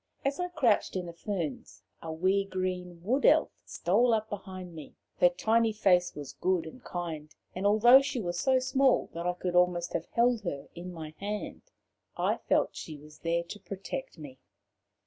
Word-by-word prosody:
As 280 +3 0
I 360 - 0
crouched 275 - +1
in 185 -1 -2
the 170 - -8
ferns, 170 -4 -5 0.2
a 165 - -5
wee 185 +5 +2
green 185 -2 -4
Wood 255 +8 +1
Elf - - +5
stole 230 +6 +2
up 220 0 -3
behind 185 -3 -7
me; 155 -3 -10 0.2
her 175 - +7
tiny 220 +5 +2
face 180 -4 +2
was 145 -3 -7
good 185 -3 0
and 205 +11 -11
kind, 165 -4 -5 0.2
and 190 +2 0
although 240 +6 +7
she 275 -2 -3
was 175 -4 -3
so 260 +5 +3
small 260 0 +2
that 170 +1 -3
I 180 - +1
could 180 0 -3
almost 180 -1 +2
have - - -2
held 235 -1 +2
her 145 -8 -5
in 175 +1 -7
my 160 -3 -7
hand, 205 +1 -4 0.6
I - - +1
felt - - +1
she 155 -2 -7
was 150 +1 -15
there 170 0 0
to 190 +5 -9
protect 200 +7 -6
me. 140 -4 -10
185 Hz, 185 wpm, -30 LUFS, 170-220 Hz, 0.6 s, her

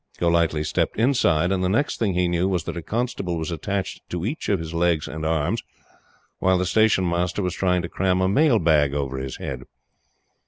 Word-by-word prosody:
Golightly 85 -3 +1
stepped 75 - -1
inside, 95 - +2
and 95 -1 0
the 90 - +1
next 120 +9 0
thing 100 -5 0
he 90 0 +2
knew 85 +1 +1
was 90 -4 0
that - - -5
a 85 - -4
constable 100 -4 -2
was 80 +2 -3
attached 95 +4 -3
to 90 0 -3
each 145 +9 -3
of 100 - +3
his 80 -1 -6
legs 85 -2 +1
and 80 0 -6
arms, 80 -2 0 0.8
while 95 0 +3
the 90 - 0
Station 105 -2 +3
Master 90 +3 -1
was 90 -2 -1
trying 90 -2 +1
to - - -3
cram 90 +1 0
a 95 - +2
mailbag 85 - +3
over 70 -2 -2
his 65 0 -5
head. 65 -1 -6
90 Hz, 200 wpm, -23 LUFS, 80-95 Hz, 0.8 s, of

